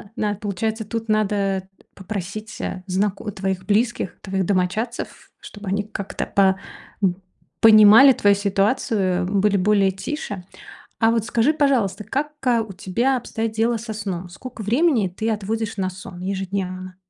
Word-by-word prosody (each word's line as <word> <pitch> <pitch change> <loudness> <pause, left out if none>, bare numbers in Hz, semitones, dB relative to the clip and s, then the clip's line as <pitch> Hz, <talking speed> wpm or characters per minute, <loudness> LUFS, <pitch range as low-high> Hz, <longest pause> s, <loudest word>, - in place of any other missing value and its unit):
на 210 -1 0
получается, 220 +2 -3
тут 225 0 -5
надо 200 -3 0 0.3
попросить, 205 +2 -6
э, 185 - -4
знако 200 +3 -1
твоих 190 -1 -3
близких, 220 -1 0
твоих 190 -1 -2
домочадцев, 200 +5 -2
чтобы 205 -1 -11
они 200 +1 0
как-то 200 -2 -5
по 190 -1 +3 0.5
н 180 -2 +2 0.5
понимали 220 +4 +9
твою 205 -3 +3
ситуацию, 200 -2 +1
были 200 +1 +2
более 195 0 +3
тише. 195 - -5 0.5
А 225 0 +4
вот 230 -2 +1
скажи, 235 +5 +2
пожалуйста, 225 -9 +1
как, 295 +3 -2 0.2
а, 235 -2 +4
у 215 - -8
тебя 235 +8 0
обстоят 225 -2 -3
дела 230 +2 +1
со 225 0 -6
сном? 185 -4 -4
Сколько 220 +5 -9
времени 235 - +2
ты 220 +5 -3
отводишь 215 +1 -2
на 185 -1 0
сон 185 -1 -10
ежедневно? 185 -1 -4
205 Hz, 145 wpm, -22 LUFS, 190-225 Hz, 0.5 s, понимали